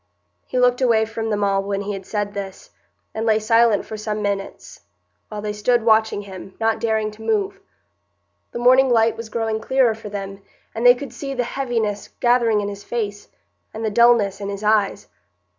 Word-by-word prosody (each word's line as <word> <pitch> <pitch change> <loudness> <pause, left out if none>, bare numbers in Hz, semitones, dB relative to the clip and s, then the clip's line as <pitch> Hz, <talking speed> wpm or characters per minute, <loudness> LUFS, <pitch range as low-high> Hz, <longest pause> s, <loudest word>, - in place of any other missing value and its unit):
He 255 - -3
looked 250 0 +3
away 230 -3 +3
from 225 0 -4
them 205 -1 0
all 195 -1 +2
when 200 0 -3
he 205 +1 -4
had 195 -1 -8
said 205 -1 -2
this, 195 -2 -7 0.4
and 220 - -3
lay 220 -1 +3
silent 225 -1 +3
for 220 - -7
some 215 0 -3
minutes, 200 -1 -4 0.5
while 210 -1 -6
they 210 -1 -2
stood 230 +3 +1
watching 220 -2 +3
him, 190 -1 -10
not 225 0 +1
daring 220 -2 0
to 215 +1 -15
move. 395 - -1 0.9
The - - -6
morning 255 +2 +5
light 230 -1 +3
was 230 -1 -8
growing 220 -1 -2
clearer 255 -1 +2
for 220 -1 -9
them, 195 -1 -6 0.3
and 230 +2 +2
they 245 - +8
could 260 -1 -8
see 275 +2 -5
the 250 - 0
heaviness 230 -5 -2
gathering 235 -3 +3
in 200 - -3
his 200 0 -7
face, 205 -2 -4 0.5
and 220 +1 -4
the 215 - -1
dulness 210 -3 +3
in 200 - -4
his 200 +1 -6
eyes. 210 -1 +1
220 Hz, 190 wpm, -21 LUFS, 205-235 Hz, 0.9 s, they